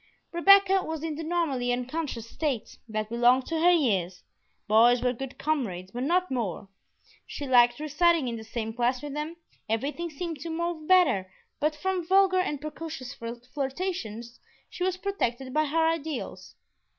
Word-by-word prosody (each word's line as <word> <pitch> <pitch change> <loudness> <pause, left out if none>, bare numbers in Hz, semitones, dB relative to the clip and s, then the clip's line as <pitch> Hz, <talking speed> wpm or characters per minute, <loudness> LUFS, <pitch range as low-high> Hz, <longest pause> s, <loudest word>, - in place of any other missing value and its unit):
Rebecca 390 +2 +6
was 320 -3 -5
in 325 -1 -2
the 320 +2 -5
normally 310 -7 0
unconscious 250 -1 -3
state 270 -2 -3
that 215 0 -2
belonged 245 +2 +4
to 325 -1 -2
her 350 - +6
years; 195 - +1 0.4
boys 235 +3 +5
were 250 0 +2
good 270 +2 -7
comrades, 205 - -2
but 245 - -5
no 345 +7 +2
more; 205 -6 -3 0.6
she 290 - -6
liked 240 -1 +5
reciting 310 0 +2
in 235 - -2
the 220 - -7
same 225 0 -4
class 245 +3 0
with 290 -1 -5
them, 300 +3 -4 0.3
everything 285 +10 -2
seemed 325 0 -5
to 335 - -6
move 330 -1 -3
better; 295 - +4 0.3
but 305 +1 +1
from 370 +3 -1
vulgar 380 0 +4
and 295 -6 -1
precocious 305 -3 -6
flirtations 245 - -5 0.3
she 360 - -4
was 370 0 0
protected 265 - -2
by 310 +1 +2
her 320 +2 +2
ideals. 320 -2 -4
285 Hz, 160 wpm, -27 LUFS, 240-330 Hz, 0.6 s, Rebecca